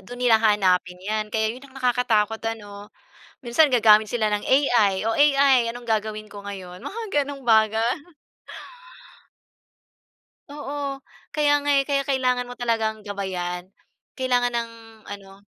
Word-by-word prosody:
do'n 220 +6 -11
nila 245 -3 +3
hahanapin 190 -4 +2
'yan 215 +1 -2
kaya 220 0 -1
'yon 260 +3 -13
ang 265 - -17
nakakatakot 235 -4 +1
ano? 205 -2 -7 0.5
Minsan 265 +4 +2
gagamit 220 -3 +6
sila 225 -3 +1
ng 210 0 -2
AI 235 -8 +3
o 225 - -1
AI 280 -2 +5
anong 240 0 -11
gagawin 215 -1 -2
ko 205 -1 -11
ngayon 185 -2 -9
mga 405 -10 -2
ganung 280 0 -8
bagay. 225 0 +2 2.5
Oo. 285 -1 -5 0.3
Kaya 295 -1 +3
nga, 290 - +1
eh. 275 -1 +3
Kaya 275 -1 +1
kailangan 255 -2 0
mo 245 - -10
talagang 225 -3 -2
gabayan. 190 -3 -5 0.4
Kailangan 245 -2 0
ng 235 -1 -2 0.4
ano, 195 -1 -10
225 Hz, 135 wpm, -23 LUFS, 210-260 Hz, 2.5 s, gagamit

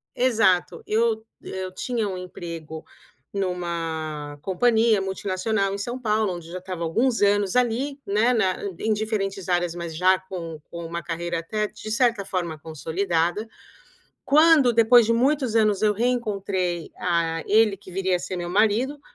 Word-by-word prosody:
exato, 215 -9 +2
eu 220 0 +1 0.2
eu 185 -1 -6
tinha 230 +1 -2
um 185 - -4
emprego 165 -3 -8 0.5
em 195 -1 0
uma 160 -4 -4
companhia 220 +2 +3
multinacional 195 +1 -1
em - - -3
São 240 +5 -4
Paulo, 215 -5 0
onde 170 -1 -9
eu - - -11
já 185 - -4
estava 180 -2 -5
alguns 230 +9 +1
anos 205 0 +2
ali, 250 +4 +1
né, 215 +5 +2
na 190 -5 +1 0.2
em 220 - 0
diferentes 200 -3 -2
áreas 175 -1 +1
mas 170 -2 -5
já 185 +2 +4
com 175 -4 -7
com 170 -1 -7
um - - -12
carreira 170 0 -3
até 210 +5 -2
de 215 - -10
certa 230 -4 +2
forma 170 -4 -3
consolidada, 170 +5 -1 0.8
quando 295 -3 +5
depois 230 +1 +6
de 230 - +2
muitos 260 -1 +1
anos 215 -3 +3
eu 210 -1 +4
reencontrei 200 -7 -1
a 170 -2 0
ele 210 -2 +4
que 185 -1 -14
viria 190 0 0
a - - -1
ser 185 - -5
meu 175 0 -4
marido, 220 +8 +2
195 Hz, 160 wpm, -24 LUFS, 175-225 Hz, 0.8 s, depois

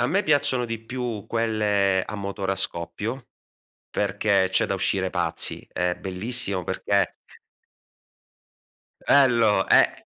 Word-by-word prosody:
A - - +1
me 200 +2 +1
piacciono 135 -4 +2
di 115 -1 -5
più 120 -4 -5
quelle 105 -4 +1
a 105 - -6
motore 100 -1 -3
a - - -4
scoppio, 105 +8 -4 0.6
perché 100 -1 +1
c'è 95 - +2
da - - -1
uscire 95 0 0
pazzi. 85 -3 -2
È 90 0 -1
bellissimo 95 0 -1
perché - - 0 1.9
Bello, 115 -8 +4
e - - +4
105 Hz, 120 wpm, -24 LUFS, 95-115 Hz, 1.9 s, Bello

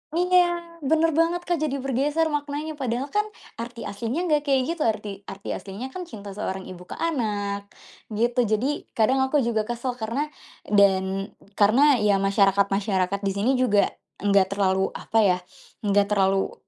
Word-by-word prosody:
Iya 345 -1 +2
bener 320 +3 +2
banget 335 +3 +1
Kak 345 -3 -1
jadi 280 -3 -1
bergeser 290 +5 +1
maknanya 295 +1 -3
padahal 255 +2 -2
kan 420 +1 +1 0.3
arti 235 0 -6
aslinya 230 - -3
nggak 295 -1 +1
kayak 270 -2 +3 0.2
gitu, 300 - 0
arti 205 -2 -3
arti 195 +1 -8
aslinya 210 +7 -6
kan 360 +1 -7
cinta 205 - -9
seorang 190 -2 -4
ibu 180 -1 -10
ke - - -7
anak 205 -10 -2 0.5
gitu. 240 +3 +1
Jadi 245 +8 -1
kadang 245 +4 +3
aku 275 0 +2
juga 220 -2 0
kesel 240 +1 -3
karena 270 +8 -2 0.4
dan 195 -1 +3 0.3
karena 250 +6 +5
ya 205 -1 +3
masyarakat-masyarakat 195 -1 +2
di 195 - +1
sini 210 +6 +1
juga 210 -5 +3 0.3
enggak 195 -1 +3
terlalu 190 -1 +2
apa 225 - 0
ya, 180 -2 +4 0.5
enggak 200 0 +3
terlalu 195 -1 +2
230 Hz, 155 wpm, -24 LUFS, 200-290 Hz, 0.5 s, karena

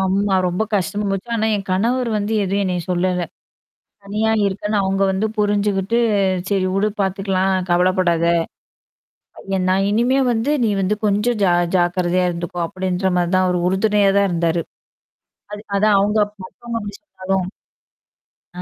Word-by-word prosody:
ஆமா. 195 +1 +1
ரொம்ப 180 +4 -1
கஷ்டமா 205 +2 -1
போச்சு, 195 +4 -4
ஆனா 220 0 0
என் 195 - -7
கணவர் 235 +6 0
வந்து 205 +2 -2
எதுவும் 200 +1 0
என்னைய 180 -2 -2
சொல்லல. 180 0 0 0.8
தனியா 210 +2 -1 0.2
இருக்கேன்னு 205 +2 -1
அவங்க 195 0 -1
வந்து 190 +3 0
புரிஞ்சுகிட்டு 205 0 0 0.5
"சரி 195 -2 +1
உடு. 200 +2 +2
பாத்துக்கலாம் 190 -1 0
கவலப்படாத. 175 -1 +2 1.3
ஏ - - +1
நான் 190 +1 +2
இனிமே 240 +5 +2
வந்து 230 +5 -1
நீ - - +2
வந்து 195 +2 +1
கொஞ்சம் 210 +3 +1
ஜா 180 -2 +4 0.2
ஜாக்கிரதையா 180 0 +1
இருந்துக்கோ" 175 0 -5
அப்படின்ற 185 +1 -2
மாரி 175 -1 +1
தான் 185 0 +3
அவர் 180 -1 0
உறுதுணையா 200 +1 +2
தான் 200 0 +3
இருந்தாரு. 170 -1 0 0.9
அது 210 - -7
அதான் 210 0 +3
அவுங்க 210 +2 +1 0.3
மத்தவங்க 235 +4 -6
அப்டி 205 -1 -7
சொன்னாலும். 190 -8 -3 1.1
ஆ. - - -3
195 Hz, 140 wpm, -19 LUFS, 185-210 Hz, 1.3 s, ஜா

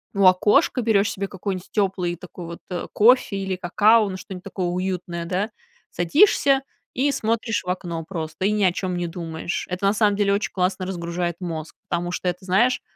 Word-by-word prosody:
у 195 -1 +3
окошка, 210 - +4
берешь 215 -2 +3
себе 195 +1 -3
какой-нибудь 190 -1 -5
теплый 185 -4 0
такой 180 0 -10
вот, 170 0 -8
э, 180 -2 -3
кофе 230 -1 +4
или 190 -1 -2
какао, 210 +5 +4
ну, 185 - -5
что-нибудь 185 -1 -9
такое 190 -2 -3
уютное, 180 -1 -3
да. 190 +5 -1 0.4
Садишься 275 - +4 0.3
и 280 +3 +1
смотришь 225 -3 -1
в 180 - -6
окно 170 -3 -4
просто 165 0 -4
и 205 - +3
ни 210 -1 +1
о 185 - +5
чём 180 0 -3
не 175 0 -2
думаешь. 165 -1 -4
Это 180 +2 -1
на 200 - +3
самом 210 -1 +3
деле 200 -1 +2
очень 200 +1 -1
классно 185 0 0
разгружает 175 -1 -3
мозг. 160 -4 -5 0.2
Потому 175 +1 -1
что 180 - -3
это, 180 +1 -2
знаешь, 235 +8 +3
185 Hz, 190 wpm, -23 LUFS, 175-205 Hz, 0.4 s, о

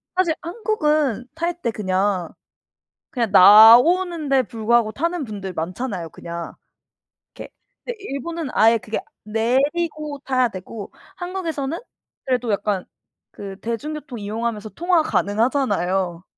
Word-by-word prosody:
사실 365 -3 +2
한국은 305 - 0
탈 340 +1 -3
때 235 - -1
그냥, 190 -3 -1 0.8
그냥 230 -6 -2
나오는데 270 - +7
불구하고 230 -1 +1
타는 335 +5 -2
분들 200 -5 -6
많잖아요 180 +1 -4
그냥. 170 -1 -7 0.8
게 - - -9 0.4
근데 485 -2 -5
일본은 330 -1 -5
아예 225 +1 +5
그게 215 +1 -4 0.2
내리고 285 +7 -1
타야 255 -2 +2
되고 200 +1 -8 0.3
한국에서는 335 -5 -4 0.5
그래도 250 -3 0
약간 200 -2 -1 0.5
그 195 -1 -8
대중교통 255 +2 -5
이용하면서 215 +1 -4
통화 345 -1 +2
가능하잖아요. 195 - 0
240 Hz, 270 characters per minute, -21 LUFS, 205-310 Hz, 0.8 s, 나오는데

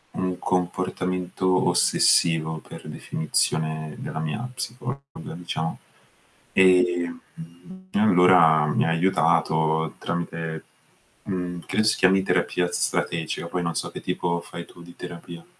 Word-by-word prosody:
un 90 -1 -2
comportamento 90 0 0
ossessivo, 80 -1 +3
per - - -10
definizione 80 -1 -1
della - - -5
mia 80 +11 -3
psicologa, 130 +2 -5 0.3
diciamo. 80 -2 -3 0.8
Ehm, 90 -2 +3 0.7
allora 90 - +5
mi 75 - +1
ha - - +1
aiutato 80 -2 +2
tramite, 85 -2 -4 0.6
mhmm, 90 -2 -4
credo 110 - +1
si 110 - +3
chiami 95 +1 +4
terapia 90 -2 0
strategica, 85 0 -1
poi 90 +1 -2
non 85 -1 -2
so - - -3
che - - -7
tipo 85 0 -1
fai 85 0 -8
tu 85 - -16
di 85 0 -13
terapia. 85 -1 -9
85 Hz, 115 wpm, -24 LUFS, 80-90 Hz, 0.8 s, allora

